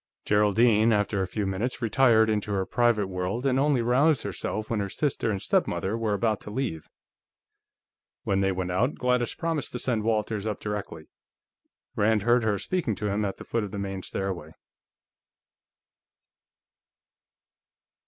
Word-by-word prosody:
Geraldine, 105 Hz, +2 st, +4 dB
after 105 Hz, -2 st, +1 dB
a 95 Hz, -, -1 dB
few 105 Hz, +2 st, -3 dB
minutes, 95 Hz, +6 st, -2 dB
retired 115 Hz, -1 st, +4 dB
into 105 Hz, -1 st, -1 dB
her 95 Hz, -1 st, 0 dB
private 120 Hz, -3 st, +2 dB
world 95 Hz, +6 st, -3 dB
and 135 Hz, -1 st, +2 dB
only 140 Hz, -4 st, +2 dB
roused 135 Hz, +4 st, +3 dB
herself 105 Hz, +2 st, -4 dB
when 115 Hz, -, -1 dB
her 100 Hz, -1 st, -2 dB
sister 135 Hz, -1 st, -1 dB
and 100 Hz, -3 st, -1 dB
stepmother 95 Hz, +2 st, 0 dB
were 110 Hz, -2 st, 0 dB
about 110 Hz, 0 st, 0 dB
to -, -, -9 dB
leave. 105 Hz, -, -4 dB, 1.3 s
When 95 Hz, 0 st, +1 dB
they 95 Hz, 0 st, +2 dB
went 90 Hz, -1 st, -3 dB
out, 120 Hz, +10 st, +1 dB
Gladys 125 Hz, -1 st, 0 dB
promised 165 Hz, -3 st, -2 dB
to -, -, -2 dB
send 120 Hz, -3 st, 0 dB
Walters 110 Hz, -1 st, -1 dB
up 105 Hz, -, -3 dB
directly; 105 Hz, -7 st, -6 dB, 0.8 s
Rand 105 Hz, 0 st, +2 dB
heard 120 Hz, +1 st, +3 dB
her 105 Hz, -2 st, +1 dB
speaking 145 Hz, -, -1 dB
to 105 Hz, +2 st, -3 dB
him 105 Hz, +2 st, 0 dB
at 100 Hz, -2 st, -3 dB
the -, -, -9 dB
foot 115 Hz, -2 st, -1 dB
of 105 Hz, -, -4 dB
the 100 Hz, -, -6 dB
main 95 Hz, -1 st, -4 dB
stairway. 90 Hz, -5 st, -4 dB
105 Hz, 155 wpm, -26 LUFS, 100-120 Hz, 1.3 s, Geraldine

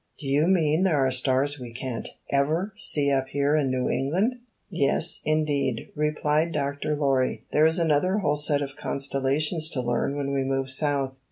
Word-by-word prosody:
"Do 150 Hz, -, -10 dB
you 145 Hz, +4 st, +2 dB
mean 165 Hz, -3 st, +2 dB
there 155 Hz, -8 st, +2 dB
are 130 Hz, -, +1 dB
stars 135 Hz, +2 st, +1 dB
we 125 Hz, -2 st, -8 dB
can't 125 Hz, -1 st, -5 dB, 0.2 s
ever 155 Hz, +9 st, 0 dB
see 140 Hz, -2 st, +1 dB
up 135 Hz, -1 st, +1 dB
here 140 Hz, +2 st, +1 dB
in 145 Hz, -3 st, +1 dB
New 130 Hz, -1 st, -1 dB
England?" 190 Hz, -, 0 dB, 0.3 s
"Yes, 170 Hz, -1 st, +1 dB
indeed," 145 Hz, -6 st, -1 dB
replied 150 Hz, +2 st, 0 dB
Dr. 145 Hz, +1 st, -2 dB
Lorry. 135 Hz, -3 st, 0 dB
"There 155 Hz, +1 st, +4 dB
is 160 Hz, +2 st, +1 dB
another 170 Hz, +3 st, +2 dB
whole 150 Hz, -8 st, +1 dB
set 145 Hz, -1 st, +2 dB
of 135 Hz, -1 st, -7 dB
constellations 140 Hz, +4 st, 0 dB
to 140 Hz, -, -4 dB
learn 120 Hz, +4 st, -1 dB
when 140 Hz, -1 st, -2 dB
we 135 Hz, -1 st, 0 dB
move 135 Hz, 0 st, -2 dB
South. 135 Hz, -1 st, -1 dB
145 Hz, 175 wpm, -25 LUFS, 135-155 Hz, 0.3 s, There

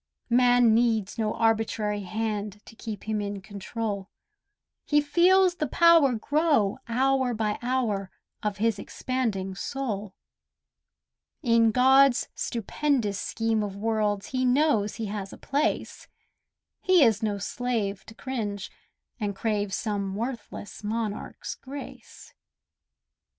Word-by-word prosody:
Man 245 Hz, -1 st, +5 dB
needs 225 Hz, -2 st, +1 dB
no 215 Hz, -1 st, 0 dB
arbitrary 220 Hz, -2 st, 0 dB
hand 210 Hz, 0 st, -3 dB
To 225 Hz, -, -14 dB
keep 220 Hz, -3 st, -7 dB
him 215 Hz, -1 st, -2 dB
in 200 Hz, 0 st, -4 dB
control; 200 Hz, 0 st, -5 dB, 0.7 s
He 295 Hz, -, +3 dB
feels 355 Hz, +5 st, +4 dB
the 300 Hz, -, -1 dB
power 330 Hz, -3 st, +5 dB
grow 285 Hz, -4 st, +1 dB
hour 260 Hz, +1 st, +1 dB
by 215 Hz, -1 st, -1 dB
hour 235 Hz, -6 st, -1 dB, 0.3 s
Of 210 Hz, -2 st, -2 dB
his 220 Hz, -1 st, +1 dB
expanding 215 Hz, -9 st, -2 dB
soul: 215 Hz, -4 st, -4 dB, 1.3 s
In 230 Hz, -2 st, +4 dB
God's 265 Hz, +2 st, +5 dB
stupendous 230 Hz, -2 st, -1 dB
scheme 225 Hz, +1 st, -1 dB
of 205 Hz, -2 st, -4 dB
worlds 210 Hz, -1 st, -1 dB
He 255 Hz, -1 st, -1 dB
knows 250 Hz, -5 st, +2 dB
he 225 Hz, -, -4 dB
has 200 Hz, -1 st, -5 dB
a -, -, -10 dB
place; 285 Hz, +2 st, -2 dB, 0.7 s
He 370 Hz, -4 st, +5 dB
is 225 Hz, -3 st, +3 dB
no 210 Hz, -2 st, -1 dB
slave 210 Hz, -2 st, -2 dB
to 225 Hz, -, -12 dB
cringe, 215 Hz, -7 st, -4 dB, 0.5 s
and 205 Hz, -2 st, -2 dB
crave 205 Hz, -2 st, -1 dB
Some 200 Hz, -2 st, -2 dB
worthless 230 Hz, -2 st, -6 dB
monarch's 215 Hz, 0 st, -4 dB
grace. 275 Hz, +1 st, -10 dB
225 Hz, 120 wpm, -27 LUFS, 205-255 Hz, 1.3 s, Man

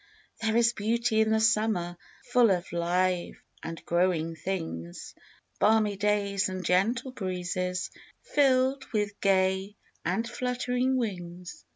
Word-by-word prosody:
There 220 Hz, 0 st, +1 dB
is 235 Hz, 0 st, +4 dB
beauty 225 Hz, +1 st, +1 dB
in 220 Hz, -, +2 dB
the 220 Hz, 0 st, +3 dB
summer 215 Hz, -5 st, +1 dB, 0.4 s
Full 245 Hz, -2 st, +5 dB
of 180 Hz, -2 st, 0 dB
live 175 Hz, +1 st, 0 dB, 0.3 s
and 165 Hz, 0 st, -7 dB
growing 170 Hz, -2 st, +1 dB
things, 160 Hz, -, -5 dB, 0.5 s
Balmy 215 Hz, -1 st, +3 dB
days 200 Hz, -1 st, +1 dB
and 185 Hz, -1 st, -5 dB
gentle 230 Hz, +8 st, +1 dB
breezes, 180 Hz, -3 st, -3 dB, 0.3 s
Filled 270 Hz, -1 st, +2 dB
with 205 Hz, -1 st, -1 dB
gay 190 Hz, +1 st, +2 dB, 0.3 s
and 190 Hz, +7 st, -1 dB
fluttering 250 Hz, +1 st, -1 dB
wings. 180 Hz, -6 st, -5 dB
200 Hz, 115 wpm, -28 LUFS, 180-225 Hz, 0.5 s, Full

